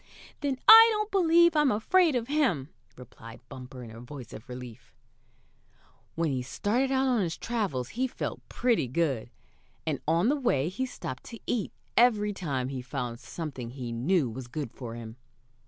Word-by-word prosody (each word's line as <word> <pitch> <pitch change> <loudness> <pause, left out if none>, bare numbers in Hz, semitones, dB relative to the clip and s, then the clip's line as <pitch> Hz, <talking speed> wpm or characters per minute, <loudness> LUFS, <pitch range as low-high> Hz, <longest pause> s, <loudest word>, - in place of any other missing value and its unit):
"Then 280 -3 -1
I 450 +1 +11
don't 425 0 -1
believe 340 -3 +5
I'm 300 -2 +4
afraid 320 - +3
of 235 -1 -1
him," 255 - +1 0.3
replied 115 -2 -12
Bumper, 130 0 -9
in 115 - -10
a 115 +1 -10
voice 125 -1 -10
of 120 +5 -11
relief. 125 -2 -10 1.2
When 165 -2 0
he 130 -2 -1
started 230 - -1
out 265 0 +2
on 250 -4 +2
his 170 -3 -2
travels 195 - -2
he 255 - -1
felt - - -5
pretty 235 - +1
good, 135 -3 -1 0.6
and 155 -4 -2
on 170 +8 +3
the 290 - +3
way 170 - +1
he 260 +8 -3
stopped 130 - -7
to 230 - -9
eat 225 -5 -1 0.2
every 215 -4 +4
time 140 -9 -3
he 135 -2 -4
found 125 -2 -5
something 140 -8 -6
he 125 -1 -6
knew 140 +6 +1
was 120 +2 -7
good 140 -1 -5
for 120 -3 -7
him. 115 0 -9
160 Hz, 170 wpm, -28 LUFS, -, 1.2 s, I